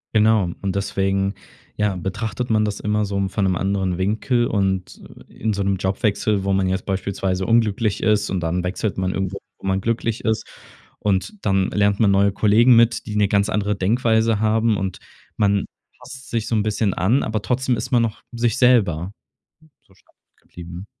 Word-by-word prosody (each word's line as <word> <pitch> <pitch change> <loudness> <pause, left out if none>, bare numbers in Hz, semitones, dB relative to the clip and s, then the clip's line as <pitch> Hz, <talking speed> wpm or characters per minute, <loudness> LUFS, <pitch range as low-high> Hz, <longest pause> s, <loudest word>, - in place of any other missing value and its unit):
Genau. 110 -4 +4
Und 95 -1 -2
deswegen 95 0 -1 0.4
ja, 105 -2 0
betrachtet 110 +6 -4
man 110 -1 +2
das 105 -1 -3
immer 105 0 0
so 100 0 -4
m 100 -1 0
von 100 +1 -1
'nem 95 - +1
anderen 95 -1 -1
Winkel 115 +5 0
und 95 -3 -1 0.3
in 110 0 -3
so 100 - -2
'nem 95 0 0
Jobwechsel, 100 +1 0
wo 100 - 0
man 95 -1 +1
jetzt 95 0 -2
beispielsweise 95 -1 -2
unglücklich 110 -2 +1
ist 105 -1 +2
und 95 -2 -2
dann 85 +2 -1
wechselt 95 +3 -2
man 95 0 -1
irgendwo, 95 0 -3 0.2
wo - - -7
man 95 0 +1
glücklich 115 +1 -2
ist. 110 -1 0 0.5
Und 100 - 0
dann 95 -1 +2
lernt 100 -1 +1
man 105 -3 +4
neue 100 +1 +3
Kollegen 110 +5 +4
mit, 115 0 +3
die 105 - -5
'ne 105 -1 +3
ganz 100 +1 +1
andere 105 -1 0
Denkweise 110 +2 +1
haben. 110 0 +2
Und 95 -2 -4 0.4
man 100 -1 +2 0.3
passt 130 0 -11
sich 115 -2 -2
so 115 - 0
'n 105 - +2
bisschen 105 -2 0
an, 115 +9 +1
aber 110 -1 -2
trotzdem 125 +1 0
ist - - -5
man 120 -2 +4
noch 115 -2 -3
sich 120 +1 0
selber 100 -9 +3 0.7
so - - -27
stark 95 - -30 0.3
geblieben. 90 +2 -10
100 Hz, 185 wpm, -21 LUFS, 95-110 Hz, 0.7 s, Genau